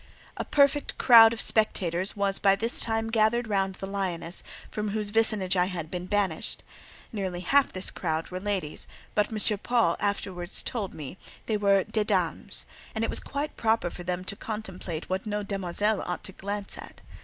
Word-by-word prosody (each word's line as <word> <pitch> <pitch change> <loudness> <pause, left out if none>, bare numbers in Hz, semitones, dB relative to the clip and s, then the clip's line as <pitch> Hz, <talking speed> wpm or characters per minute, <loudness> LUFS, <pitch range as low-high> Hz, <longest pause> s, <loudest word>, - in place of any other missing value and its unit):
A - - -3
perfect 285 0 +2
crowd 225 -3 +8
of 230 - -4
spectators 190 -5 +2
was 200 -1 +1
by 195 -1 +4
this 230 +4 +3
time 225 0 0
gathered 225 +2 +2
round 195 -2 0
the 195 - -6
Lioness, 185 -3 -1 0.3
from 210 0 -3
whose 210 0 -2
vicinage 210 -4 +3
I 180 -1 +3
had 170 -4 -5
been 180 0 -4
banished; 195 -5 -1 0.5
nearly 190 -4 -3
half 275 +10 +3
this 185 0 -1
crowd 160 -2 -3
were 185 - -4
ladies, 190 -6 -2 0.3
but 210 - +2
M. 215 -1 +4
Paul 230 -7 +2
afterwards 190 -3 -1
told 210 -6 -3
me, 150 +4 -8 0.3
these 215 -2 -1
were 200 -2 +4
"des 215 - -1
dames," - - -1 0.3
and 220 - -1
it - - 0
was - - +3
quite 285 +2 -4
proper 220 -6 +1
for - - -8
them 180 +1 -3
to 200 - -1
contemplate 190 -7 -6
what 190 +3 -3
no 210 0 -2
"demoiselle" 200 +1 -1
ought 180 - -4
to - - -6
glance 200 +1 -5
at. - - -11
200 Hz, 180 wpm, -27 LUFS, 185-220 Hz, 0.5 s, crowd